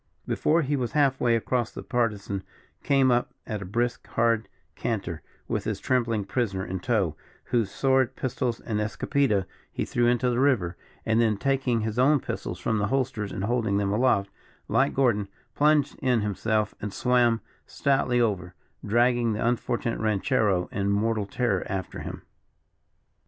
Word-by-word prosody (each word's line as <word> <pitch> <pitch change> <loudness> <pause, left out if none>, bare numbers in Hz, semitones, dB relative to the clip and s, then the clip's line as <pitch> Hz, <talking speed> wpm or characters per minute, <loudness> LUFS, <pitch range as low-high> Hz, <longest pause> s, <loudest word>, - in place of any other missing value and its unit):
Before 165 +2 +2
he 145 +1 0
was 125 -4 -2
half 140 -3 +2
way 120 -1 +3
across, 120 +1 0
the - - -8
Partisan 105 -5 -1 0.4
came 135 -3 +3
up 120 0 0
at 105 -3 -4
a - - -5
brisk, 120 +5 -2
hard 115 -1 +1 0.3
canter, 95 -8 -3 0.3
with - - -2
his - - -2
trembling 115 -5 0
prisoner 100 -4 -1
in 95 0 -4
tow, 95 -6 0 0.3
whose 115 -5 0
sword, 130 +2 +2
pistols, 125 -2 -2
and 105 -3 -3
escopeta 105 -1 +1 0.3
he - - -2
threw 120 -1 +1
into 125 +1 +2
the 120 - 0
river, 115 -11 +2 0.3
and 110 +1 +3
then 110 -3 +2
taking 130 -1 +1
his 110 +2 -2
own 145 +3 +5
pistols - - -5
from 110 -1 -1
the 100 - +1
holsters, 120 -4 -1
and 95 - -4
holding 110 -2 +1
them 100 -1 0
aloft, 105 -4 +2 0.4
like - - +2
Gordon, 115 -7 +2 0.3
plunged 150 -1 +3
in 125 -4 +2
himself 105 +1 0
and 105 - -3
swam 120 0 +2 0.3
stoutly 135 -3 +1
over, 95 -6 0 0.3
dragging 120 +1 +2
the 105 +2 -1
unfortunate 120 0 -1
ranchero 100 -3 +1
in 100 0 -1
mortal 105 0 +1
terror 115 -4 0
after 95 -2 -4
him. - - -7
115 Hz, 160 wpm, -26 LUFS, 105-125 Hz, 0.4 s, own